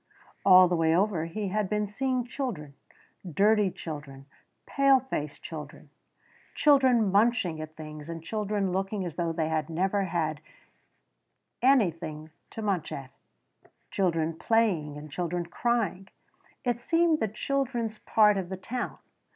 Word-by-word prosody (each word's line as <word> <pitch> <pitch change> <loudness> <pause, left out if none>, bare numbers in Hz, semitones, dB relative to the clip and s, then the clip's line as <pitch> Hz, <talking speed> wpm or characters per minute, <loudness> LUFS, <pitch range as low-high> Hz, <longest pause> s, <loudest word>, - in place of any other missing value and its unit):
All 185 -1 +8
the 175 - 0
way 165 -1 +3
over 185 -3 +1
he 200 +4 -3
had 210 0 -1
been 210 0 0
seeing 255 +4 -1
children: 240 - -5 0.6
dirty 205 +4 +3
children, 145 -6 -8 0.4
pale 275 -1 +4
faced 150 - -5
children, 150 -2 -9 0.6
children 260 -8 +4
munching 200 -6 +2
at 155 0 -8
things 155 0 -9
and 165 -1 -6
children 205 0 -1
looking 195 +1 -2
as 170 - -5
though 170 0 -1
they 160 -1 -1
had 155 0 -1
never 190 +4 0
had 155 -4 -2 1.2
anything 165 - +1 0.2
to 225 - -7
munch 195 -6 -1
at 135 -1 -7 0.8
children 165 -4 0
playing 175 -9 +1
and 150 0 -10
children 175 +1 -2
crying 195 -1 -1 0.6
it 245 -2 0
seemed 330 +4 +2
the 220 - +1
children's 235 -1 -2
part 210 -2 +4
of 190 0 -4
town. 250 +3 -4
190 Hz, 135 wpm, -28 LUFS, 160-225 Hz, 1.2 s, All